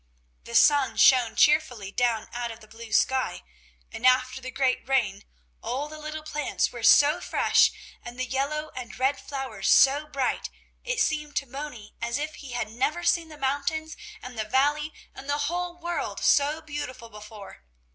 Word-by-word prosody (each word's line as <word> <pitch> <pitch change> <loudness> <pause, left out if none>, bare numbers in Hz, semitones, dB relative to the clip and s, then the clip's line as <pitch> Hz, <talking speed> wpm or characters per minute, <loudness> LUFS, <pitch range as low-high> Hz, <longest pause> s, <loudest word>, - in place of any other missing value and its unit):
The 115 - -7
sun 285 -3 +4
shone 250 -4 +5
cheerfully 255 -10 +2
down 230 -1 0
out 240 0 -3
of 225 0 -9
the 215 - -16
blue 225 +1 -12
sky, 260 - +1 0.5
and 225 - -9
after 255 +1 +3
the 255 - -6
great 260 0 -1
rain, 210 -7 0 0.4
all 255 +6 -3
the 310 0 -10
little 305 0 -6
plants 300 -2 -1
were 240 - -8
so 290 +8 +5
fresh, - - +3 0.3
and 240 +1 -9
the 255 - 0
yellow 295 +4 -2
and 250 -2 -8
red 265 +2 +1
flowers 265 -8 -4
so 285 +3 +5
bright, 275 -4 -2 0.3
it - - -2
seemed 300 -6 -1
to - - 0
Moni 270 -5 -8
as 235 +2 -1
if 305 +1 -4
he 270 -4 -10
had 230 -3 -3
never 295 +9 -1
seen 335 -1 +2
the 305 - -11
mountains 285 +3 -2 0.3
and 250 -3 -8
the - - 0
valley 295 +4 +1 0.2
and 275 - -11
the 290 - +1
whole 345 +4 -2
world 345 0 -4
so 295 +3 +2
beautiful 290 -6 -6
before. 210 - -12
270 Hz, 175 wpm, -26 LUFS, 240-300 Hz, 0.5 s, shone